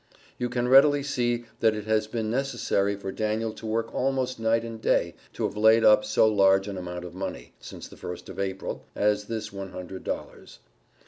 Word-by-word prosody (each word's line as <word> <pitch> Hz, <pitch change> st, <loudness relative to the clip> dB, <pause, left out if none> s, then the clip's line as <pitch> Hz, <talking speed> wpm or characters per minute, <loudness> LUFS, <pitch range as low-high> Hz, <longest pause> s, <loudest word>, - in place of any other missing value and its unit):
You 125 Hz, 0 st, -1 dB
can 120 Hz, 0 st, -1 dB
readily 140 Hz, +2 st, +6 dB
see 120 Hz, -4 st, -1 dB
that 110 Hz, -1 st, +3 dB
it 105 Hz, -1 st, -5 dB
has 110 Hz, 0 st, +1 dB
been 110 Hz, -1 st, -3 dB
necessary 115 Hz, -6 st, 0 dB
for 100 Hz, -1 st, -6 dB
Daniel 110 Hz, +2 st, -2 dB
to 110 Hz, -, -9 dB
work 115 Hz, +1 st, -2 dB
almost 130 Hz, -2 st, -1 dB
night 115 Hz, +1 st, +2 dB
and 115 Hz, -1 st, -7 dB
day -, -, +1 dB, 0.2 s
to -, -, -4 dB
have -, -, -1 dB
laid 110 Hz, +2 st, +5 dB
up 105 Hz, 0 st, +6 dB
so 105 Hz, +1 st, +3 dB
large 95 Hz, -2 st, +4 dB
an 100 Hz, -, -5 dB
amount 90 Hz, -1 st, -6 dB
of 90 Hz, -, -9 dB
money, 75 Hz, -9 st, -6 dB
since -, -, -9 dB
the -, -, -15 dB
first 90 Hz, -, -7 dB
of -, -, -9 dB
April, 95 Hz, -1 st, -4 dB
as 105 Hz, 0 st, +1 dB
this 110 Hz, -1 st, -5 dB
one 95 Hz, -1 st, -7 dB
hundred 90 Hz, +1 st, -7 dB
dollars. -, -, -6 dB
110 Hz, 200 wpm, -26 LUFS, 100-115 Hz, 0.2 s, readily